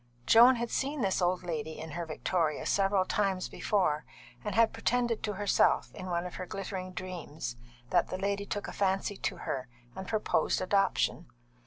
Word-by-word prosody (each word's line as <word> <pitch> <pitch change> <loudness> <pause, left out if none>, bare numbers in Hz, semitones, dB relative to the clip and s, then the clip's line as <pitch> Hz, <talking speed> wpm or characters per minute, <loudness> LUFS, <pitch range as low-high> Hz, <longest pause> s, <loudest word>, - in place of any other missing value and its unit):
Joan 240 - +8
had 235 -1 -3
seen 280 +1 -1
this 195 -2 +1
old 180 +1 +1
lady 160 -2 -4
in 160 0 -7
her 170 +1 -4
victoria 160 0 -1
several 195 -1 +2
times 190 -2 0
before, 160 -7 0 0.4
and 210 - -3
had 230 0 +4
pretended 240 -2 0
to 210 - -2
herself, 205 0 +2
in 185 - -7
one 175 -1 -1
of 180 - -6
her 185 - -5
glittering 190 -1 -5
dreams, 170 -8 -6 0.4
that 175 - +3
the 185 - -4
lady 200 +1 -1
took 205 - -3
a - - -5
fancy 195 +1 0
to - - -2
her 130 -2 -3 0.3
and 190 0 -6
proposed 215 -7 +1
adoption. 185 -2 +1
190 Hz, 175 wpm, -30 LUFS, 175-205 Hz, 0.4 s, Joan